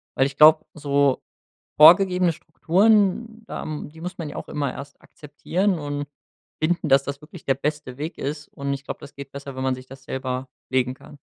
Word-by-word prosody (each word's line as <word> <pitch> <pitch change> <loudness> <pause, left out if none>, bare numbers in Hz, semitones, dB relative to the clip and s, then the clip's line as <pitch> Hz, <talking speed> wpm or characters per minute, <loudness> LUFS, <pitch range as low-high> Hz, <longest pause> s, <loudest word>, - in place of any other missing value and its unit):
weil 135 - +3
ich 140 0 -4
glaub, 155 +1 +7
so 140 -2 +1 0.6
vorgegebene 180 +2 +7
Strukturen, 215 +7 +1
da - - -6 0.2
die 160 +2 -12
muss 180 +2 -6
man 165 -3 -4
ja - - -8
auch - - -7
immer 140 -3 -2
erst 140 +1 -10
akzeptieren 175 +6 -2
und 145 -1 -4 0.6
finden, 170 0 +1
dass 135 0 +5
das 140 0 -5
wirklich 155 +2 -13
der 135 - +2
beste 145 -1 -4
Weg 155 +4 -5
ist. 145 +1 -4
Und 140 0 -4
ich 135 0 -5
glaub, - - -6
das 145 -1 -12
geht 140 -1 -9
besser, 140 -1 -8
wenn 130 - -3
man 130 -1 +1
sich 130 - -10
das 135 0 -13
selber 130 0 -4 0.2
legen 130 -1 +1
kann. 145 - -15
145 Hz, 195 wpm, -23 LUFS, 135-165 Hz, 0.6 s, glaub